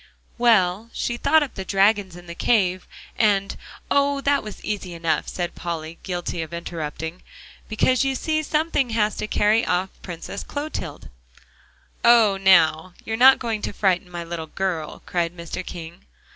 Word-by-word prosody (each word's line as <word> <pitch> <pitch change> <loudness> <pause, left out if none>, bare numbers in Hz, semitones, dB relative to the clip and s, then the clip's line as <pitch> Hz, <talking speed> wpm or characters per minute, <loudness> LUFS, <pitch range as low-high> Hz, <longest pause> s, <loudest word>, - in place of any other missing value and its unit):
"Well, 220 -2 +3
she 240 - -2
thought 300 +5 +3
up 280 - -6
the 190 - -5
dragons, 195 -1 +2
and 175 0 -12
the 170 - -6
cave, 185 -2 +1 0.3
and"? 200 -3 +2 0.4
"Oh! 280 0 +2
that 280 0 +2
was 210 -1 -9
easy 195 -4 -4
enough," 165 -1 -1
said 175 -1 -3
Polly, 165 -1 -5
guilty 175 -2 -3
of 160 +1 -6
interrupting, 160 0 -5 0.5
"because 255 +4 +2
you 270 0 0
see 310 +3 0
something 305 -3 0
has 215 -2 +1
to - - -3
carry 215 +2 +3
off 185 +1 -1
the - - -30
Princess 175 +2 -7
Clotilde." 285 - -6 0.9
"Oh, 230 -4 +6
now! 175 -2 +4
you 220 - -3
are - - +2
not 260 +3 +7
going 225 -3 -3
to - - -3
frighten 185 -3 +1
my 175 -1 -5
little 165 -1 -5
girl," 170 -3 -3
cried 175 0 -2
Mr. 170 +2 -5
King. 170 -1 -9
190 Hz, 165 wpm, -23 LUFS, 170-230 Hz, 0.9 s, not